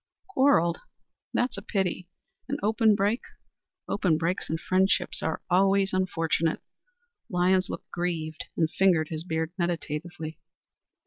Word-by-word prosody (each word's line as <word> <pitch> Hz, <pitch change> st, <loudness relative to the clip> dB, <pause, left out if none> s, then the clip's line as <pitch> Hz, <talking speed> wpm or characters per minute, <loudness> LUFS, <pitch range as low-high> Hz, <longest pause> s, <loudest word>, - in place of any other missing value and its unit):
"Quarrelled? 260 Hz, -, +3 dB, 0.6 s
That 245 Hz, 0 st, +2 dB
is -, -, -5 dB
a -, -, -11 dB
pity. 190 Hz, -4 st, -2 dB, 0.4 s
An -, -, -1 dB
open 220 Hz, 0 st, +4 dB
break? 205 Hz, +4 st, +1 dB, 0.7 s
Open 180 Hz, -6 st, +2 dB
breaks 170 Hz, +3 st, -1 dB
in 160 Hz, -, 0 dB
friendship 185 Hz, +3 st, +2 dB
are 160 Hz, -, -2 dB
always 195 Hz, +1 st, +3 dB
unfortunate." 165 Hz, -3 st, 0 dB, 0.7 s
Lyons 185 Hz, +1 st, +2 dB
looked -, -, -7 dB
grieved, 165 Hz, -3 st, -3 dB
and 160 Hz, -, +3 dB
fingered 165 Hz, -2 st, +2 dB
his 160 Hz, -1 st, -4 dB
beard 160 Hz, -1 st, -2 dB
meditatively. 165 Hz, -1 st, -3 dB
180 Hz, 125 wpm, -27 LUFS, 160-195 Hz, 0.7 s, open